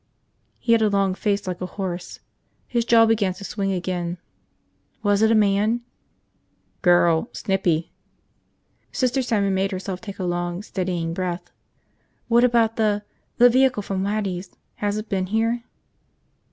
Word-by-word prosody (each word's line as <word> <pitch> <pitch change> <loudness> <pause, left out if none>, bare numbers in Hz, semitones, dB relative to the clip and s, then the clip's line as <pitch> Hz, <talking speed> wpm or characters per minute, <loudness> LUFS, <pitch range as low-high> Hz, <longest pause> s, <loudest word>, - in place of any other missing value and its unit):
He 235 - -1
had 230 -1 +5
a 215 - +3
long 195 -2 +1
face 200 +1 -1
like 185 -1 -4
a 180 - -2
horse. 180 -3 -5 0.5
His 235 -2 0
jaw 230 -1 +6
began 210 -5 +1
to 200 - -10
swing 195 -1 -2
again. 180 -1 -2 0.9
"Was 205 0 +2
it 220 - +5
a 225 - +4
man?" 210 +3 +2 1.0
"Girl. 175 +1 +4
Snippy." 180 -5 0 1.0
Sister 260 0 +1
Simon 205 -6 +1
made 190 +1 +1
herself 185 -1 -4
take 200 -3 -8
a 190 - -4
long, 175 +1 -2
steadying 180 -5 -2
breath. 180 0 -4 0.8
"What 235 +1 +5
about 230 -2 +3
the 210 -2 +1 0.2
– - - -45
the 245 - +8
vehicle 255 -3 +3
from 190 -1 -2
Waddy's? 195 -3 -2 0.3
Has 205 0 -1
it 215 +1 -5
been 190 -3 -1
here?" 230 +3 0
200 Hz, 150 wpm, -23 LUFS, 185-225 Hz, 1.0 s, the